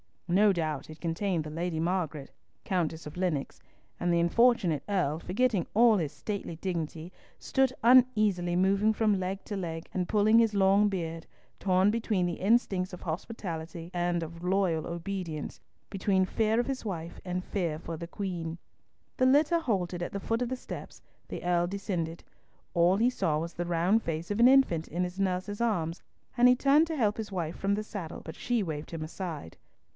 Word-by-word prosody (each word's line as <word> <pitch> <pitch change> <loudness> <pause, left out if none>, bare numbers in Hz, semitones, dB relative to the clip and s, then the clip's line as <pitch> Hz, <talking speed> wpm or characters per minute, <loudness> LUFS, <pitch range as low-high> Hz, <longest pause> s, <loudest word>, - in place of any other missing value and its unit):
No 200 +3 +4
doubt 155 -5 -3
it 155 - -11
contained 170 0 -1
the 150 - -7
Lady 165 +1 -3
Margaret, 165 -5 -2 0.3
Countess 170 -6 -1
of 150 +3 -9
Lennox; 175 -7 -2 0.4
and 175 0 +1
the 170 - +3
unfortunate 185 - +3
Earl, 175 -7 0
forgetting 200 +1 0
all 225 0 +6
his 155 -6 -2
stately 200 -5 -5
dignity, 165 -1 -4 0.3
stood 265 -1 +1
uneasily 215 -8 +4
moving 195 +4 +3
from 215 -3 +2
leg 190 +1 -3
to 205 - -4
leg, 165 -3 -5
and 180 -1 -1
pulling 215 +2 +4
his 225 -2 +3
long 200 +1 +4
beard, 165 -4 -4 0.3
torn 190 +1 +3
between 215 -5 0
the 175 -1 -1
instincts 195 -3 +1
of 180 - -8
hospitality 170 -2 -5
and 175 -1 0
of 165 +1 -8
loyal 180 -3 +1
obedience, 170 -3 -5 0.3
between 190 -1 +1
fear 220 +3 +1
of - - -5
his 270 -3 -4
wife 170 -5 -5
and 180 0 -2
fear 170 -7 -2
of 165 -1 -5
the 170 - -6
Queen. 170 -3 -4 0.6
The 255 - +3
litter 295 +5 +4
halted 185 - -1
at 175 - -4
the 200 - -3
foot 225 +4 -1
of 245 - -1
the 260 - -1
steps, 250 - -9 0.3
the - - -6
Earl 175 0 +2
descended. 175 -4 -3 0.5
All 175 +2 +4
he 235 +4 +4
saw 185 -11 0
was 165 +2 -4
the 175 - -3
round 175 +6 +2
face 165 +1 -4
of 205 - -1
an 240 - +8
infant 255 -12 +4
in 175 +2 -2
its 180 +2 -7
nurse's 195 +1 -1
arms, 175 -8 0 0.4
and 245 +1 +7
he 250 - +6
turned 285 +5 +4
to 320 - -3
help 215 -7 +1
his 215 -3 -5
wife 170 -3 -3
from 200 +1 +1
the 215 - -3
saddle, 190 -6 -7
but 160 - -9
she 240 -3 0
waved 155 -4 -5
him 165 -2 -4
aside. 155 - -6
185 Hz, 185 wpm, -29 LUFS, 165-210 Hz, 0.6 s, an